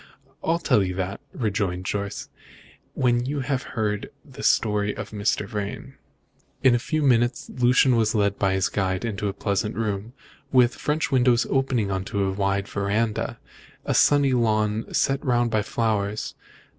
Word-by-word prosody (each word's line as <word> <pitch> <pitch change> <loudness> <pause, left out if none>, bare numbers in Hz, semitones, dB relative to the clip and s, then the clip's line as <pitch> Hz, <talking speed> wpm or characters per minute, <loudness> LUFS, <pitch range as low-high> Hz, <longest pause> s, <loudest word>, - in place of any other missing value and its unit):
"I'll 165 +1 +2
tell 165 -10 +2
you 90 -1 -2
that," 95 +2 -3
rejoined 100 - -2
Jorce, 100 0 -3 0.7
"when 120 -1 +2
you 145 0 -2
have 135 0 -1 0.2
heard 105 -2 -1 0.2
the - - -11
story 105 -1 +1
of - - -6
Mr. 105 -1 -1
Vrain." 105 -2 -5 0.7
In 130 -2 +6
a 120 - +2
few 155 +5 -1
minutes 120 -2 +2
Lucian 125 +1 +4
was 115 -1 +1
led 100 -1 +1
by 95 -1 +2
his 95 -1 +1
guide 95 0 -1
into 105 -2 -2
a 100 - -2
pleasant 100 +2 -1
room, 110 +1 -3 0.4
with 125 -2 +5
French 150 +2 -1
windows 125 -2 +3
opening 130 -7 +1
on 95 -1 -1
to 100 0 -1
a 95 - 0
wide 100 0 0
verandah, 105 +2 -1 0.5
and - - -1
a - - +3
sunny 145 -2 +4
lawn 110 -2 +1
set 135 0 +1
round 120 -4 +1
with 110 0 +1
flowers. 105 -2 -1
110 Hz, 165 wpm, -24 LUFS, 100-125 Hz, 0.7 s, In